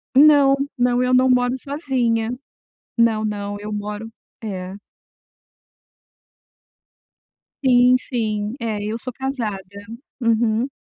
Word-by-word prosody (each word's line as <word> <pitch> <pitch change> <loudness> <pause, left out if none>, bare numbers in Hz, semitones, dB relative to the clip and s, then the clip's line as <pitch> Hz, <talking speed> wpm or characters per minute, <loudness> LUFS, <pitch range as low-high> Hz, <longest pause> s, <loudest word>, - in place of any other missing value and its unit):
Não, 285 -1 +7 0.2
não 245 0 +2
eu 250 - +1
não 255 +1 +5
moro 250 0 +2
sozinha, 255 -6 -1 0.7
não 225 -2 +2
não, 205 -1 -3
eu 210 +1 -6
moro 210 +1 -5 0.3
é. 190 -3 -5 2.9
Sim 250 -1 +5
sim, 215 -5 -3
é, 220 -3 -3
eu 215 +2 -3
sou 255 +2 -6
casada. 245 -6 -3 0.6
Uhum. 230 +1 +2
230 Hz, 100 wpm, -21 LUFS, 215-255 Hz, 2.9 s, Não